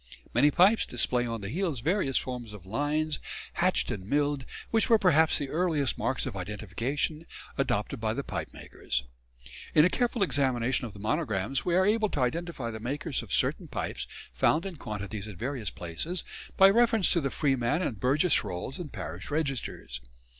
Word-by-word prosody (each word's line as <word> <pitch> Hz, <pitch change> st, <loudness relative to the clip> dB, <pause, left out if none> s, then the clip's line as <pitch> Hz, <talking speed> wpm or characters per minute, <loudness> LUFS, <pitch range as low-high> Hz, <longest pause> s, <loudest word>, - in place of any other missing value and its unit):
Many 145 Hz, -, +5 dB
pipes 190 Hz, +9 st, +4 dB
display 120 Hz, 0 st, +1 dB
on 115 Hz, -2 st, -3 dB
the 100 Hz, -, -4 dB
heels 160 Hz, -, -1 dB
various 155 Hz, -, +1 dB
forms 125 Hz, -4 st, -4 dB
of 100 Hz, -3 st, -11 dB
lines, 145 Hz, +8 st, 0 dB, 0.3 s
hatched -, -, +1 dB
and 95 Hz, -, -4 dB
milled, 145 Hz, +4 st, 0 dB, 0.3 s
which 225 Hz, -2 st, +3 dB
were 230 Hz, -, +7 dB
perhaps 160 Hz, -6 st, +4 dB
the 140 Hz, -, -3 dB
earliest 155 Hz, -5 st, +1 dB
marks 130 Hz, -, -1 dB
of -, -, -4 dB
identification 115 Hz, -, -3 dB, 0.3 s
adopted -, -, -1 dB
by -, -, 0 dB
the -, -, -2 dB
pipe -, -, -4 dB
makers. -, -, -4 dB, 0.7 s
In 150 Hz, -, +8 dB
a 180 Hz, -, +3 dB
careful 240 Hz, -3 st, +1 dB
examination 130 Hz, -6 st, +1 dB
of 105 Hz, -, -11 dB
the 100 Hz, -, -11 dB
monograms 110 Hz, -, -1 dB
we 175 Hz, -, +2 dB
are 190 Hz, +1 st, +4 dB
able 215 Hz, +1 st, +3 dB
to 145 Hz, -, -2 dB
identify 135 Hz, -2 st, -1 dB
the 110 Hz, -, -6 dB
makers 140 Hz, +5 st, -2 dB
of -, -, -11 dB
certain -, -, +1 dB
pipes 60 Hz, +1 st, -4 dB, 0.3 s
found 155 Hz, -, +2 dB
in 190 Hz, -4 st, -5 dB
quantities 105 Hz, -3 st, -5 dB
at 105 Hz, -4 st, -8 dB
various 120 Hz, -2 st, -3 dB
places, 120 Hz, -, -4 dB, 0.3 s
by 195 Hz, -, +9 dB
reference 230 Hz, -2 st, +4 dB
to 170 Hz, -, +3 dB
the 135 Hz, -, 0 dB
freeman 135 Hz, +3 st, +1 dB
and 115 Hz, -, -2 dB
burgess 145 Hz, -, +3 dB
rolls 90 Hz, -, -4 dB
and 160 Hz, -6 st, -6 dB
parish 90 Hz, -1 st, -6 dB
registers. 135 Hz, -, -3 dB
135 Hz, 175 wpm, -29 LUFS, 110-170 Hz, 0.7 s, by